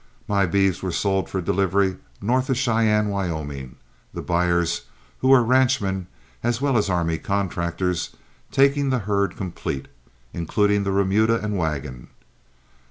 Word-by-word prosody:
My 100 -2 +2
beeves 95 0 +1
were 95 - -2
sold 95 +2 0
for 95 - -2
delivery 95 +1 +1 0.2
north 130 +5 +1
of 130 - +1
Cheyenne, 110 -4 +2
Wyoming, 80 -9 -4 0.4
the - - -4
buyers, 85 -1 +1 0.3
who 130 - 0
were 135 -2 +7
ranchmen 120 -7 +2 0.3
as 120 0 0
well 140 -1 +1
as 105 -3 +2
army 85 -3 0
contractors, 90 -2 -2 0.4
taking 140 +1 +3
the 130 - +2
herd 100 -2 0
complete, 85 -7 -4 0.5
including 100 +4 +1
the 100 - 0
remuda 100 +4 +2
and 105 -1 -2
wagon. 75 -8 -3
100 Hz, 135 wpm, -23 LUFS, 85-110 Hz, 0.5 s, were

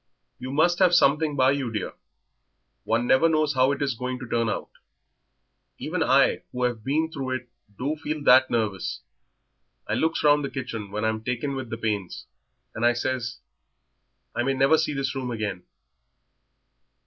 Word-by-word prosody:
"You 130 - -6
must 175 +5 +2
have 180 -2 +5
something 150 -1 +3
by 130 -1 +4
you, 135 -4 -2
dear; 105 -4 -4 0.9
one 115 +2 +1
never 130 +7 +4
knows 155 -2 +1
how 130 +1 +3
it 140 0 -1
is 140 -2 0
going 125 +2 -4
to 125 -1 -8
turn 115 -1 0
out; 100 - -4 1.1
even - - -3
I - - +3
who 125 0 -3
have 120 -3 -1
been 155 +5 0
through 130 -4 -3
it 120 -1 -7 0.3
do 140 +5 -2
feel 155 -1 -4
that 130 -1 +6
nervous. 105 -5 -2 0.9
I - - -2
looks 160 +1 0
round 145 0 +4
the 140 - -2
kitchen 115 -6 -5
when 105 +2 -3
I'm 110 0 -1
taken 125 +4 -2
with 130 -3 -5
the 115 - -4
pains, 105 -5 -3 0.5
and 115 - -5
I 120 0 +5
says, 120 -1 -3 1.0
'I - - 0
may 135 +2 +1
never 135 +4 +4
see 155 - 0
this 135 0 -2
room 130 -2 -4
again.'" 105 -6 -3
130 Hz, 170 wpm, -25 LUFS, 115-145 Hz, 1.1 s, that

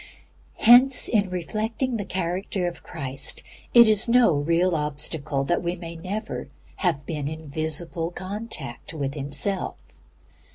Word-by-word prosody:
Hence, 250 +3 +7
in 205 -4 +2
reflecting 220 +7 -2
the 205 - -4
character 185 +1 -2
of 175 - -6
Christ, 135 +1 -4 0.3
it 235 -1 +8
is 215 +2 +4
no 240 -6 +5
real 170 +5 +1
obstacle 150 -2 -2
that 175 +5 0
we 175 0 -2
may 170 -1 -8
never 190 +6 -5 0.3
have 155 -7 0
been 150 -3 -3
in 155 0 -7
visible 160 +2 0
contact 185 - -7
with 140 -2 -2
Himself. 145 +7 -2
175 Hz, 130 wpm, -25 LUFS, 150-205 Hz, 0.3 s, it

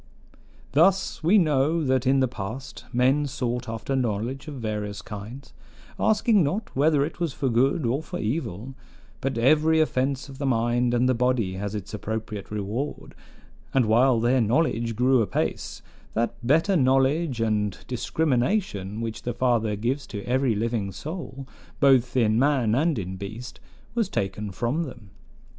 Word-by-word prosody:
"Thus 185 +6 +3
we 180 +7 +5
know 155 -1 +2
that 130 -2 +1
in 135 0 +4
the 130 - +3
past 120 +4 -7
men 130 +4 +2
sought 125 -3 -3
after 115 +4 -3
knowledge 125 +3 -2
of 150 - -6
various 105 -4 -4
kinds, 115 +6 -9 0.5
asking 215 -1 +3
not 185 +10 -3
whether 145 +1 +3
it 165 - -8
was 170 -5 -1
for 135 - -1
good 130 +5 +2
or 125 +6 0
for - - -6
evil: 115 - -3 0.5
but 135 -2 -2
every 155 +6 +4
offense 135 -3 0
of 135 -1 -11
the 140 - -2
mind 120 0 +1
and 125 +1 +3
the 130 - +3
body 120 -5 +1
has 100 +2 -4
its 105 -1 -6
appropriate 105 -1 -5
reward; 105 +7 -4 0.6
and 130 -3 +4
while 120 +2 +4
their 120 +3 +3
knowledge 115 -1 +1
grew 125 +2 +3
apace, 105 - -2 0.3
that 115 +1 0
better 160 +10 +3
knowledge 135 0 +2
and 105 -3 -1
discrimination 125 - -1
which 115 -1 -4
the 120 -1 -4
Father 115 -4 +1
gives 125 +6 -2
to 100 -2 -6
every 130 -1 +1
living 110 -2 -1
soul, 140 - -7 0.3
both 130 -3 +4
in 110 -2 +3
man 130 -5 +2
and 150 +3 +2
in 95 -2 -4
beast, 110 +6 -8 0.3
was 230 -5 0
taken 100 - -2
from 120 - -1
them. 120 -7 -11
125 Hz, 155 wpm, -25 LUFS, 110-140 Hz, 0.6 s, we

